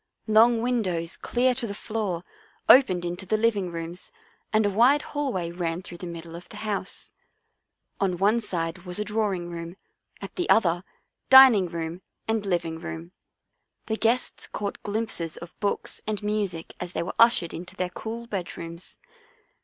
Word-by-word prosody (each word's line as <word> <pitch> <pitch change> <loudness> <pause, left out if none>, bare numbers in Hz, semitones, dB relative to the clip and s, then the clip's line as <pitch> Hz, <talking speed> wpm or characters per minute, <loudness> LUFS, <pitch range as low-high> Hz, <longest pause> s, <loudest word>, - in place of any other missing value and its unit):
Long 225 +1 +5
windows 185 -9 -1
clear 255 +1 +1
to 245 -1 -3
the 200 - -5
floor 205 -6 -3 0.4
opened 185 -10 +6
into 175 +2 -4
the 215 - +2
living 210 -5 +1
rooms 170 +1 -6 0.4
and 215 -1 +3
a - - +3
wide 250 +8 +5
hallway 245 - -1
ran 170 0 -3
through 175 -1 -10
the 180 - -6
middle 170 -1 -8
of 175 - -10
the - - -10
house. 200 -2 -3 0.9
On 185 -3 +1
one 210 +5 +3
side 170 -4 -3
was 180 -1 -5
a 210 - 0
drawing 205 -5 -1
room, 170 +1 -6 0.4
at - - -9
the 355 - -1
other, 175 -4 +4 0.5
dining 260 -8 +9
room 165 +1 -5 0.3
and 220 -2 0
living 170 -3 -1
room. 170 0 -7 0.7
The 220 - -1
guests 230 +3 0
caught 200 -1 -4
glimpses 205 -6 -2
of 170 0 -11
books 205 - -2
and 215 -1 -2
music 205 -6 -2
as 175 0 -6
they - - -1
were 170 - -4
ushered 230 -8 +5
into 175 +2 -8
their 180 -1 -2
cool 230 +5 -6
bedrooms. 170 -4 -6
190 Hz, 160 wpm, -26 LUFS, 170-220 Hz, 0.9 s, dining